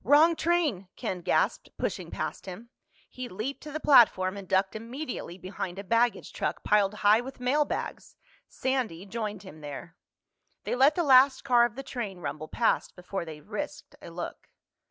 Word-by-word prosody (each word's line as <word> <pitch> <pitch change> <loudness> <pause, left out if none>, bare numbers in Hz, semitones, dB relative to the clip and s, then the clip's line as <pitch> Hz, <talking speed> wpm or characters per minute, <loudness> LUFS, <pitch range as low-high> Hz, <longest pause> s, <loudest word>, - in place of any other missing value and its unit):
"Wrong 300 - +6
train!" 315 - +1
Ken 180 -1 -4
gasped, - - +1
pushing - - -3
past - - -5
him. 210 +6 -8 0.4
He 255 -1 -7
leaped 220 +9 -4
to 300 - -8
the 310 - -3
platform 210 -10 +5
and 200 -2 -8
ducked 190 +2 +1
immediately 235 - -6
behind 185 -1 -6
a 200 - -5
baggage 230 +4 +1
truck - - -3
piled 210 -1 +3
high 215 +3 +6
with 260 +1 -9
mailbags. 285 +4 -1 0.3
Sandy 245 -10 -2
joined 210 -1 -4
him 155 -5 -12
there. 145 +3 -8 0.7
They - - -2
let 270 +4 +5
the 345 - +1
last 265 -1 +6
car 245 -3 +5
of 235 -2 -4
the 270 - -6
train 220 -8 -5
rumble 155 -1 -5
past 230 - 0
before 180 0 -5
they 155 -2 -9
risked - - -6
a - - -9
look. - - -7
225 Hz, 170 wpm, -28 LUFS, 185-265 Hz, 0.7 s, Wrong